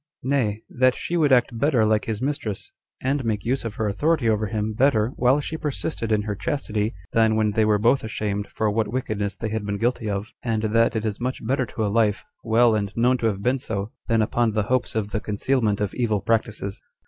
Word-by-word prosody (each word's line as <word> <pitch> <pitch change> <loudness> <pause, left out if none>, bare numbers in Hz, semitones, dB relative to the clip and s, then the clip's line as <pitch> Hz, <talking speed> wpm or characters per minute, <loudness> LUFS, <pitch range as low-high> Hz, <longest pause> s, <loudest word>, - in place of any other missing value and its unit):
Nay, 120 -6 0
that 130 0 +2
she 175 - -3
would 155 -4 +3
act 125 -1 +3
better 130 -5 +3
like 110 -1 +2
his 110 +1 -3
mistress, 135 -8 -3 0.3
and 135 +1 0
make 110 -2 -2
use 130 +3 0
of 115 -2 -5
her 110 - -1
authority 145 +5 +1
over 110 -1 +1
him 110 0 -2
better 115 -2 +3
while 130 +2 +2
she 160 +2 -4
persisted 150 -5 -3
in 105 -1 +2
her 105 0 -2
chastity, 110 - -2 0.2
than 110 -1 +4
when 110 -1 +2
they 110 +1 +2
were 105 -1 +3
both 120 +6 +3
ashamed 105 -2 -3
for 110 +1 -1
what 110 0 0
wickedness 105 -5 -2
they 110 +3 -4
had 110 0 -2
been 100 0 -2
guilty 115 -1 -1
of; 100 +2 -3
and 110 -2 -1
that 115 +2 +2
it 110 0 -1
is 105 +1 -3
much 125 -2 -3
better 130 +1 0
to 110 - -2
a 100 - -1
life, 110 -2 +2 0.2
well 115 +1 +4
and 100 -2 -1
known 125 +2 +3
to 115 - +1
have 100 -2 -2
been 130 +3 +2
so, 105 -3 -3 0.2
than 115 -1 +3
upon 115 0 +1
the 110 -1 +1
hopes 130 -3 0
of 105 -2 -1
the 110 - -1
concealment 105 0 0
of 105 -2 -1
evil 110 -4 0
practices. 105 -1 -1
110 Hz, 225 wpm, -24 LUFS, 105-125 Hz, 0.3 s, than